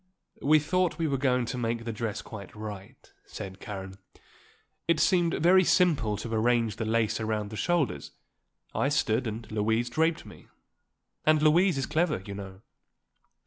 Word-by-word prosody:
"We 155 +2 +5
thought 180 +4 0
we 165 - 0
were 135 -3 -1
going 125 -2 +2
to 125 +2 -4
make 115 0 -2
the 115 - -3
dress 110 -1 -4
quite 100 -3 -10
right," 105 +3 -9
said 95 -2 -8
Karen. 95 -1 -7 0.9
"It 165 -2 +3
seemed 175 -2 +3
very 185 +4 +5
simple 150 - +2
to 115 +2 -5
arrange 115 -1 +1
the 110 - -2
lace 110 0 +1
around 110 -1 -2
the - - -6
shoulders; 145 - 0 0.6
I 140 - +1
stood 125 -4 +1
and 110 +1 -5
Louise 110 +3 0
draped 160 +5 +1
me; - - -14 0.8
and 155 0 +4
Louise 165 +3 +4
is 135 - -1
clever, 155 - 0
you 100 - -6
know." 95 -1 -9
120 Hz, 160 wpm, -28 LUFS, 105-155 Hz, 0.9 s, We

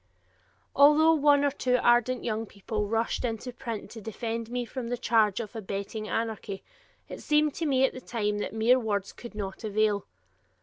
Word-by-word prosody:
Although 300 +3 +6
one 290 -2 +4
or 285 - +2
two 250 -3 +1
ardent 240 +1 +3
young 225 -1 -2
people 210 +1 -4
rushed 225 +2 -1
into 245 +1 -3
print 235 -3 -6
to 225 - -9
defend 225 +1 -4
me 245 0 -2
from 245 +1 -5
the 245 +1 -2
charge 220 -4 +2
of 230 -1 -6
"abetting 210 +1 -5
anarchy," 220 -3 -3 0.4
it - - -8
seemed 300 -1 +2
to 325 - -2
me 265 -2 +4
at - - -1
the 255 - -8
time 210 -4 -2
that - - -3
mere 225 +4 +3
words 205 -4 -2
would 235 -3 -9
not 195 -1 -5
avail. 210 -1 +1
230 Hz, 180 wpm, -28 LUFS, 215-255 Hz, 0.4 s, Although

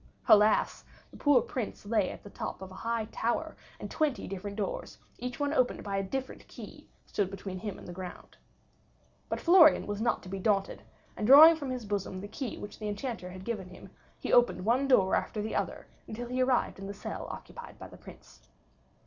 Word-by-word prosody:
Alas! 215 0 +4 0.3
the - - -13
poor 285 -5 +4
Prince 230 -5 -5
lay 210 -3 +1
at - - -9
the 205 - -10
top - - -6
of 190 - -9
a 185 - -10
high 230 -1 -1
tower, 315 +8 -2 0.2
and - - -7
twenty 305 -5 -1
different 200 +2 -6
doors, 205 - -4 0.2
each 250 +2 -5
one 285 0 0
opened 255 -5 +1
by 200 -1 -2
a - - +1
different 265 +7 -5
key, - - -11 0.2
stood 200 -3 -1
between 195 -1 -6
him 205 -1 -5
and - - -12
the 175 - -7
ground. 180 0 -9 0.9
But - - -2
Florian 335 -3 +6
was 205 0 -4
not 240 - 0
to 185 - -10
be 195 +1 -4
daunted, 195 -1 0 0.3
and 210 - -2
drawing 310 +5 +10
from 290 -4 -5
his 250 -3 -4
bosom 200 -2 -3
the 200 - -7
key 245 +2 -5
which 205 - -9
the 215 - -4
Enchanter 205 -3 -4
had 185 +1 -10
given 215 -6 -3
him, 180 - -13 0.3
he - - -3
opened 240 -6 +4
one 250 +5 +2
door 195 -8 +4
after 215 - -2
the 215 +1 -3
other - - -2 0.3
till 240 +2 -5
he 255 +1 0
arrived 255 -6 +1
in 195 - -6
the 200 - -6
cell - - -6
occupied - - -9
by - - -9
the - - -14
Prince. - - -15
215 Hz, 210 wpm, -30 LUFS, 195-255 Hz, 0.9 s, drawing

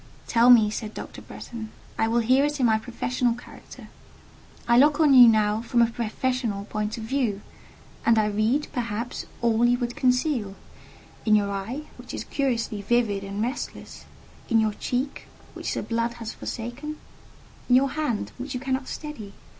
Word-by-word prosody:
"Tell 235 +1 +4
me," 220 -4 +7
said 215 0 -5
Dr. - - -8
Bretton; 225 -2 -8 0.3
"I 225 - +1
will 235 +1 +2
hear 255 +4 +4
it 295 0 -1
in 255 - +3
my 220 -2 +3
professional 240 +1 -1
character: 245 - -13 0.8
I 235 - +4
look 290 +2 +5
on 300 -3 +5
you 250 -2 +10
now 215 -1 +3
from 235 +1 0
a 235 0 +4
professional 230 -2 -2
point 210 +1 -3
of 225 - -6
view, 225 -4 -1 0.6
and 230 0 +4
I 215 - +4
read, 215 +8 +1
perhaps, 235 -2 -3 0.2
all 230 0 +3
you 240 +1 +4
would 240 -1 -3
conceal—in 250 -4 -1
your 200 -1 +1
eye, 205 +9 -4 0.2
which - - -8
is - - -4
curiously 235 -6 -1
vivid 205 -2 +1
and 200 +2 -3
restless: 250 +4 -5 0.4
in 230 - +4
your 215 -1 +1
cheek, 255 +6 -3 0.3
which - - -4
the - - -2
blood 230 0 -1
has 230 -2 -7
forsaken; 250 +6 -6 0.7
in 250 - +6
your 270 +1 +4
hand, 295 -9 -2
which 260 +1 -5
you - - -2
cannot 265 0 -2
steady. 240 -10 -7
235 Hz, 170 wpm, -25 LUFS, 220-255 Hz, 0.8 s, you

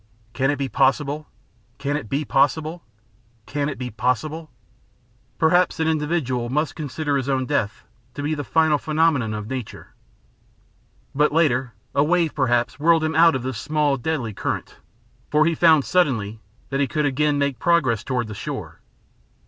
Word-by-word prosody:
Can 135 0 +1
it 145 - +2
be 140 -1 -2
possible 145 +3 +1 0.5
Can 145 +1 -2
it 145 -8 -5
be 145 +2 -1
possible? 155 +5 +1 0.6
Can 145 0 -2
it 140 - -5
be 125 -1 -5
possible?" 125 +8 -2 0.9
Perhaps 175 +1 +3
an 160 - +1
individual 150 -6 -1
must 150 +2 -1
consider 145 -1 -2
his 135 0 -3
own 130 -1 +1
death 115 -7 -1 0.3
to 145 - -5
be 150 +2 0
the 145 -1 -3
final 160 -1 +2
phenomenon 155 -8 +1
of 105 0 -5
nature. 130 -2 -7 1.2
But 150 +2 +2
later 135 -6 +1 0.2
a 140 - +3
wave 170 0 +1
perhaps 120 -2 0
whirled 165 +1 +4
him 160 0 0
out 165 0 +5
of 130 - -3
this 130 -4 -4
small, 150 -2 +1
deadly 130 -4 -3
current, - - -4 0.5
for 150 +1 +3
he 165 - +2
found 160 -3 +4
suddenly 115 - +1 0.3
that 135 - -1
he 140 - +2
could 150 +1 -1
again 145 +1 +1
make 140 -4 -1
progress 130 -10 +2
toward 125 -4 -2
the 110 - -7
shore. - - -6
145 Hz, 165 wpm, -22 LUFS, 130-155 Hz, 1.2 s, out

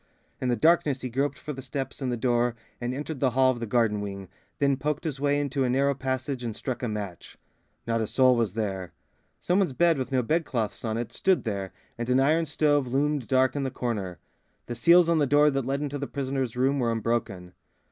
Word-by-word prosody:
In 130 - 0
the 120 - +2
darkness 150 0 +3
he 125 - -5
groped 140 +4 -1
for 150 - -6
the 135 - -7
steps 135 +1 -5
and 130 -2 -1
the 120 - -1
door 120 0 +1 0.3
and 120 +1 -2
entered 145 +2 -5
the 130 - +3
hall 130 +1 +3
of 120 - -5
the 115 - -4
garden 110 -2 +1
wing, 100 -2 -6 0.3
then 140 -1 +2
poked 150 +3 -2
his 150 -5 -3
way 145 0 +2
into 140 -1 -1
a 125 - +1
narrow 140 +2 +2
passage 130 -1 -3
and 115 -3 -4
struck 125 0 -4
a 125 - -1
match. 105 -5 -6 0.5
Not 115 -1 0
a 110 - -1
soul 130 +1 +4
was 115 -5 0
there. 95 -5 -3 0.5
Some 180 +3 +1
one's 185 -9 +1
bed, 170 +1 +3
with 130 - -4
no 130 -2 +2
bedclothes 130 -6 -1
on 110 -1 -1
it, 120 0 -4
stood 190 -1 +2
there, 100 -4 -3 0.3
and 120 +1 -3
an 125 +1 +4
iron 155 +4 +3
stove 145 -2 +2
loomed 140 0 0
dark 130 0 +2
in 145 - -1
the 135 - -1
corner. 105 -8 -3 0.5
The 120 - -5
seals 170 +8 +5
on 170 -1 +3
the 145 - +2
door 145 +2 +5
that 135 -2 -2
led 140 +1 -1
into 145 0 -3
the 140 - -3
prisoner's 130 -3 -3
room 135 +2 +2
were 120 -2 +1
unbroken. 105 -6 -2
130 Hz, 230 wpm, -27 LUFS, 115-145 Hz, 0.5 s, seals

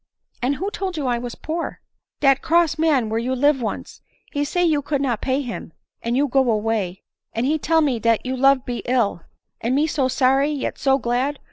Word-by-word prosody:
" - - -41
And 260 +3 +1
who 390 +7 -3
told 375 -4 -4
you 290 - -2
I 240 -2 +1
was 240 0 -6
poor 330 +2 -4 0.2
?" - - -53
" - - -69
Dat 275 -2 +4
cross 330 -2 +2
man 295 -8 +3
where 220 +1 -1
you 255 +3 -1
live 285 +1 +3
once 225 - -5
— - - -34
he 290 -1 0
say 355 +5 0
you 305 -3 +2
could 285 0 -1
not 250 -6 -1
pay 270 +2 0
him, 235 -9 -7 0.3
and 235 +2 -1
you 290 +1 +3
go 265 -1 +2
away 210 -4 -1
— - - -58
and 230 +2 0
he 310 +3 +1
tell 325 +2 +2
me 270 -6 +1
dat 230 +1 +1
your 260 +1 -2
love 270 0 +4
be 245 -1 -3
ill; 235 -8 +1 0.4
and 240 +3 0
me 295 +3 +3
so 290 -4 0
sorry, 265 +2 +3
yet 295 -3 -3
so 270 0 +3
glad 255 +3 -1
265 Hz, 240 wpm, -22 LUFS, 240-290 Hz, 0.4 s, Dat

